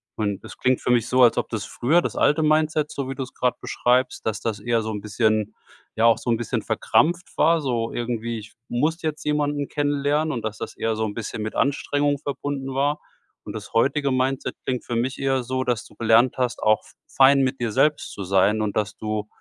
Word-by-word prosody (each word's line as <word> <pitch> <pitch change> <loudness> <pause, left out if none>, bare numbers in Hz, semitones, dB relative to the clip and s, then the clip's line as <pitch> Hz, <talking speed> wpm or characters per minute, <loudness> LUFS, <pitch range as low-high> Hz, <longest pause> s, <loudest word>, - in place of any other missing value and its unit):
Und 100 -3 -2
das - - -11
klingt 130 0 +1
für - - 0
mich 120 -2 +2
so, 125 0 +4
als 120 - +5
ob - - 0
das 110 -4 -3
früher, 155 +12 +2
das - - -4
alte 155 +2 +3
Mindset, 155 0 +2
so 140 -2 -4
wie 135 - -4
du 135 - -3
es 130 - -11
grade 125 -1 0
beschreibst, 125 +1 0
dass 110 -1 -2
das 110 -3 -2
eher 115 +1 0
so 110 - -4
'n 105 -1 -4
bisschen 110 -1 0 0.4
ja, 115 - +2
auch 115 - +6
so 120 - -5
'n 115 - +3
bisschen 120 - -2
verkrampft 175 +3 +1
war, 165 -1 +4
so 120 -4 -1
irgendwie: 115 -1 -3
„Ich 110 - -13
muss 155 +8 0
jetzt 155 -2 -3
jemanden 145 -1 0
kennenlernen“ 145 +1 0
und, 115 -3 -4
dass 110 -1 -4
das - - -6
eher 115 -1 -1
so 110 0 -1
'n 105 - -4
bisschen 110 -1 -5
mit 110 0 -4
Anstrengung 145 +1 +1
verbunden 140 -2 -4
war. 145 +2 +1 0.5
Und - - -6
das - - -8
heutige 140 +4 +2
Mindset 130 +1 -1
klingt 125 -2 -2
für 120 - -3
mich 130 +3 -1
eher 135 -1 +1
so, 130 +1 -2
dass 120 -4 -1
du - - -17
gelernt 115 +3 +3
hast, 125 -1 -1
auch 110 0 +3
f - - -18 0.2
fein 135 +1 +5
mit 130 0 0
dir 115 -2 -1
selbst 150 +6 +1
zu 100 - -6
sein 100 +3 +3
und 105 -2 -2
dass 105 -1 -1
du 110 -1 -3
125 Hz, 230 wpm, -23 LUFS, 110-145 Hz, 0.5 s, auch